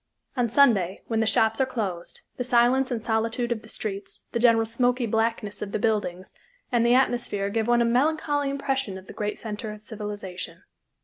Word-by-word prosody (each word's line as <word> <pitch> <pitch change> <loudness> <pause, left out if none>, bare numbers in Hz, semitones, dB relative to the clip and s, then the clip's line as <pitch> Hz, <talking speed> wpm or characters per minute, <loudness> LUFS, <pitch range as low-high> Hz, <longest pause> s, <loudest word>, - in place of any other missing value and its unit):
On 245 -3 +1
Sunday, 210 -8 +3
when 225 -1 -1
the 225 - +2
shops 225 +2 +3
are - - +4
closed, 195 -9 -4 0.2
the 250 - -1
silence 250 +2 +3
and 235 -4 -3
solitude 230 +2 0
of 225 -2 -1
the 220 - -13
streets, 200 -2 -5
the 235 - -1
general 230 -1 +5
smoky 245 +2 +1
blackness 225 -2 -1
of 205 - -5
the - - +2
buildings 205 -5 -1 0.4
and 240 -2 +3
the 240 +1 +5
atmosphere 240 -6 +1
give 225 +1 0
one 240 0 +4
a - - +1
melancholy 290 +3 +1
impression 270 -7 -2
of 190 - -11
the - - -10
great 210 0 -3
center 215 0 -5
of 210 0 -10
civilization. 205 -5 -6
225 Hz, 190 wpm, -26 LUFS, 210-245 Hz, 0.4 s, general